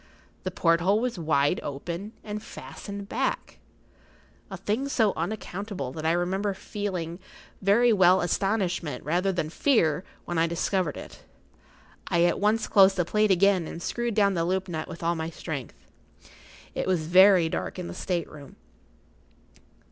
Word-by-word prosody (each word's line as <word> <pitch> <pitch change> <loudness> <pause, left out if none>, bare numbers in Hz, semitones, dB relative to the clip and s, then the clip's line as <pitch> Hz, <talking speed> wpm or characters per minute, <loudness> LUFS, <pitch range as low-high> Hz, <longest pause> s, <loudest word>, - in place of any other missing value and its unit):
The 185 - -3
porthole 175 +3 +2
was 240 -5 -2
wide 155 0 +2
open 170 +9 -5
and 210 0 -5
fastened 200 -1 -8
back—a 260 +5 -7
thing 245 +7 -2
so 220 -7 +2
unaccountable 190 - -4
that 155 +3 -4
I - - +4
remember 190 +3 -1
very 200 +3 -1
well 185 -3 +6
feeling 190 - 0
astonishment 185 -5 -1
rather 180 +6 +1
than 160 -4 -2
fear 180 - +2 0.2
when 175 -2 -2
I 165 - +3
discovered 170 -1 -1
it. - - -11 0.8
I 170 0 +2
at 175 - +2
once 215 +2 +1
closed 195 -1 +6
the 175 - +1
plate 210 +4 +2
again 190 -2 +3
and - - -7
screwed 235 +5 -2
down 200 -2 +3
the 170 -2 0
loop 190 +2 -1
nut 160 -3 -4
with 170 - -9
all 170 +1 +2
my 160 -1 -3
strength. 155 -6 -6 1.0
It - - -3
was 180 -4 +1
very 185 0 +6
dark 160 - -4
in 180 - -4
the - - -6
state 175 -3 -2
room. 145 -3 -12
185 Hz, 150 wpm, -26 LUFS, 165-205 Hz, 1.0 s, well